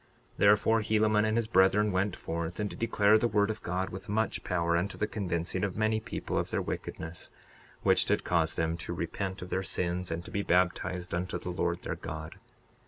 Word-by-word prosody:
62:45 -, -, -30 dB
Therefore, 105 Hz, +2 st, +5 dB
Helaman 110 Hz, 0 st, +3 dB
and 110 Hz, +1 st, +1 dB
his 115 Hz, -, +2 dB
brethren 100 Hz, 0 st, +4 dB
went 95 Hz, +1 st, 0 dB
forth, 85 Hz, +2 st, -4 dB
and 105 Hz, -, 0 dB
did -, -, -9 dB
declare 110 Hz, -2 st, +4 dB
the 120 Hz, -, +2 dB
word 105 Hz, -1 st, +2 dB
of 110 Hz, -, -7 dB
God 90 Hz, +2 st, -2 dB
with 95 Hz, +2 st, -8 dB
much 110 Hz, +2 st, 0 dB
power 85 Hz, -2 st, +1 dB
unto 90 Hz, +4 st, -1 dB
the -, -, +1 dB
convincing 95 Hz, -4 st, -2 dB
of 95 Hz, -2 st, -2 dB
many 110 Hz, 0 st, +2 dB
people -, -, -3 dB
of -, -, -2 dB
their -, -, 0 dB
wickedness, 80 Hz, +1 st, -5 dB, 0.5 s
which -, -, +4 dB
did -, -, +1 dB
cause 80 Hz, -2 st, +1 dB
them 80 Hz, 0 st, 0 dB
to 85 Hz, +1 st, -5 dB
repent 95 Hz, +3 st, -3 dB
of 90 Hz, -, -9 dB
their 95 Hz, -, +1 dB
sins 90 Hz, -1 st, -2 dB
and 85 Hz, +1 st, -4 dB
to -, -, -9 dB
be 100 Hz, -, -1 dB
baptized 90 Hz, -1 st, 0 dB
unto 90 Hz, +2 st, -1 dB
the 90 Hz, -, -5 dB
Lord 85 Hz, -1 st, -1 dB
their -, -, -2 dB
God. -, -, -7 dB
95 Hz, 210 wpm, -30 LUFS, 85-105 Hz, 0.5 s, Therefore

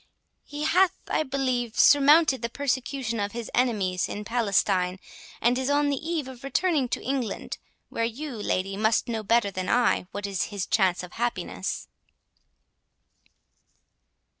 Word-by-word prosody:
He 290 Hz, +1 st, -6 dB
hath, 355 Hz, +4 st, +3 dB
I -, -, +1 dB
believe, 255 Hz, -5 st, -2 dB
surmounted 290 Hz, 0 st, +6 dB
the 235 Hz, -, -2 dB
persecution 260 Hz, -3 st, -2 dB
of 205 Hz, 0 st, -2 dB
his 235 Hz, -1 st, -6 dB
enemies 200 Hz, -8 st, +1 dB
in 210 Hz, 0 st, -5 dB
Palestine, 195 Hz, -5 st, +1 dB, 0.4 s
and 245 Hz, +2 st, +2 dB
is 260 Hz, +1 st, -1 dB
on 290 Hz, 0 st, +2 dB
the 280 Hz, -, -3 dB
eve 320 Hz, -6 st, -1 dB
of 260 Hz, -1 st, -11 dB
returning 285 Hz, -2 st, +1 dB
to -, -, -3 dB
England, 260 Hz, -3 st, -3 dB, 0.3 s
where 230 Hz, -, -2 dB
you, 265 Hz, +6 st, -3 dB
lady, 195 Hz, -2 st, -1 dB
must 220 Hz, +2 st, +1 dB
know 225 Hz, -2 st, -2 dB
better 215 Hz, -1 st, +2 dB
than 185 Hz, -1 st, -4 dB
I, 240 Hz, -6 st, +2 dB
what 205 Hz, +1 st, -5 dB
is 195 Hz, -2 st, -1 dB
his 200 Hz, -3 st, -4 dB
chance 185 Hz, -4 st, +1 dB
of 180 Hz, -, -10 dB
happiness." 240 Hz, +1 st, -3 dB
240 Hz, 145 wpm, -26 LUFS, 205-275 Hz, 0.4 s, surmounted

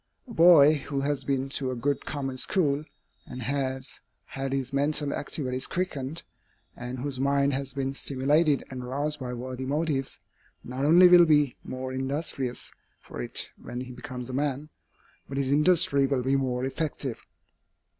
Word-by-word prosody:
A 235 Hz, -, -9 dB
boy 165 Hz, -5 st, +7 dB
who 140 Hz, -1 st, -1 dB
has 140 Hz, -1 st, -1 dB
been 135 Hz, 0 st, -1 dB
to 135 Hz, -1 st, -2 dB
a 130 Hz, -, -2 dB
good 140 Hz, +3 st, -2 dB
common 135 Hz, -3 st, -3 dB
school, 150 Hz, -4 st, +1 dB, 0.4 s
and 125 Hz, -1 st, -7 dB
has 130 Hz, 0 st, -3 dB, 0.3 s
had 135 Hz, 0 st, -5 dB
his 135 Hz, -1 st, -2 dB
mental 145 Hz, +1 st, +1 dB
activities 130 Hz, -3 st, -2 dB
quickened, 160 Hz, -4 st, -3 dB, 0.5 s
and 125 Hz, +1 st, -6 dB
whose 130 Hz, 0 st, -4 dB
mind 140 Hz, +1 st, +2 dB
has 135 Hz, 0 st, -3 dB
been 135 Hz, -1 st, -2 dB
stimulated 140 Hz, +3 st, +2 dB
and 130 Hz, -1 st, -6 dB
roused 145 Hz, +4 st, -2 dB
by 125 Hz, -2 st, -4 dB
worthy 130 Hz, +1 st, -5 dB
motives, 145 Hz, -2 st, -1 dB, 0.5 s
not 130 Hz, +3 st, -3 dB
only 175 Hz, +4 st, +8 dB
will 175 Hz, -1 st, +8 dB
be 145 Hz, -4 st, +3 dB
more 130 Hz, 0 st, -5 dB
industrious 130 Hz, -1 st, -2 dB, 0.3 s
for 65 Hz, -, -8 dB
it -, -, -2 dB
when 120 Hz, +1 st, -6 dB
he 125 Hz, 0 st, -7 dB
becomes 125 Hz, 0 st, -7 dB
a 130 Hz, -, -6 dB
man, 145 Hz, +2 st, -1 dB, 0.6 s
but 135 Hz, -, -5 dB
his 135 Hz, -1 st, 0 dB
industry 150 Hz, -2 st, +4 dB
will 135 Hz, -2 st, 0 dB
be 135 Hz, +2 st, +2 dB
more 130 Hz, -2 st, 0 dB
effective. 135 Hz, -3 st, -3 dB
135 Hz, 160 wpm, -27 LUFS, 130-145 Hz, 0.6 s, only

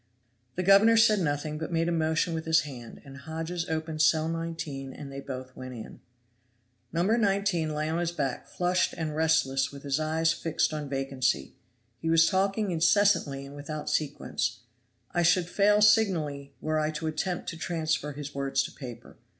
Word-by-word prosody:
The 185 Hz, -, -1 dB
governor 200 Hz, +4 st, +6 dB
said 220 Hz, -2 st, +5 dB
nothing, 150 Hz, -2 st, -2 dB
but 160 Hz, +2 st, -5 dB
made 165 Hz, 0 st, +1 dB
a -, -, +1 dB
motion 160 Hz, 0 st, +1 dB
with 160 Hz, 0 st, -3 dB
his 160 Hz, 0 st, +4 dB
hand, 125 Hz, -6 st, -9 dB
and 135 Hz, 0 st, -11 dB
Hodges 165 Hz, +4 st, -4 dB
opened 160 Hz, -1 st, -2 dB
cell 155 Hz, +1 st, +3 dB
19 160 Hz, -5 st, -4 dB
and 140 Hz, -2 st, -9 dB
they 135 Hz, -, -6 dB
both 130 Hz, -2 st, -7 dB
went 130 Hz, -1 st, -8 dB
in. 110 Hz, -, -9 dB, 0.9 s
No. 170 Hz, +1 st, 0 dB
19 195 Hz, -6 st, +1 dB
lay 155 Hz, +1 st, -1 dB
on 160 Hz, +2 st, -1 dB
his 175 Hz, -1 st, -1 dB
back 140 Hz, -6 st, -3 dB
flushed 180 Hz, +1 st, 0 dB
and 155 Hz, -2 st, -3 dB
restless 140 Hz, -4 st, +2 dB
with 140 Hz, -1 st, -11 dB
his 140 Hz, +1 st, 0 dB
eyes 160 Hz, +1 st, +1 dB
fixed 160 Hz, -1 st, -1 dB
on 150 Hz, -2 st, -4 dB
vacancy. 135 Hz, -1 st, -1 dB, 0.5 s
He 160 Hz, -, -2 dB
was 165 Hz, 0 st, +6 dB
talking 195 Hz, +2 st, +1 dB
incessantly 170 Hz, -5 st, +2 dB
and 140 Hz, +1 st, -11 dB
without 150 Hz, +1 st, -5 dB
sequence. 135 Hz, -5 st, -2 dB, 0.5 s
I 175 Hz, -, +1 dB
should 175 Hz, +1 st, +3 dB
fail 205 Hz, +3 st, +3 dB
signally 160 Hz, -10 st, +2 dB
were 155 Hz, 0 st, 0 dB
I 155 Hz, 0 st, 0 dB
to 155 Hz, +1 st, -5 dB
attempt 175 Hz, +3 st, -2 dB
to 165 Hz, -, -7 dB
transfer 160 Hz, -3 st, -2 dB
his 145 Hz, 0 st, -7 dB
words 140 Hz, -1 st, 0 dB
to -, -, -6 dB
paper. 120 Hz, -4 st, -10 dB
160 Hz, 175 wpm, -28 LUFS, 140-175 Hz, 0.9 s, governor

